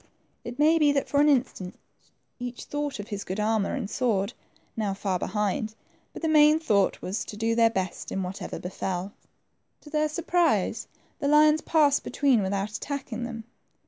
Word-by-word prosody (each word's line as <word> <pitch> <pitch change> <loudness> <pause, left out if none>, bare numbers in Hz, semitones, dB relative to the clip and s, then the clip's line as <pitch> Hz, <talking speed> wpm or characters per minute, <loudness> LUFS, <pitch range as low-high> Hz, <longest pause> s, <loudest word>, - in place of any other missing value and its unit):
It 240 +1 -7
may 315 +3 +4
be 295 -2 +5
that 275 - 0
for 285 - +2
an 300 - +5
instant 240 -9 0 0.6
each 245 0 -6
thought 290 -2 -3
of 205 0 -8
his 205 -1 -4
good 185 +3 -4
armor 215 -1 +1
and 255 -7 -3
sword, 210 -3 0 0.4
now 205 -3 -1
far 195 -2 -1
be - - -3
hind, 210 +2 -1 0.4
but - - -10
the - - +2
main 305 0 +6
thought 210 -12 +1
was 190 +4 -2
to 210 - -8
do 225 +1 +1
their 230 0 +5
best 190 -5 -4
in 195 - -2
whatever 185 +2 -5
befell. 185 +1 -4 0.7
To 295 - -14
their 305 0 +1
surprise, 340 +2 +1 0.3
the 280 - -1
lions 300 +1 +5
passed 295 -3 +3
between 270 -6 +2
without 195 +2 -1
attacking 245 0 -4
them. 230 -2 -6
230 Hz, 175 wpm, -27 LUFS, 200-295 Hz, 0.7 s, main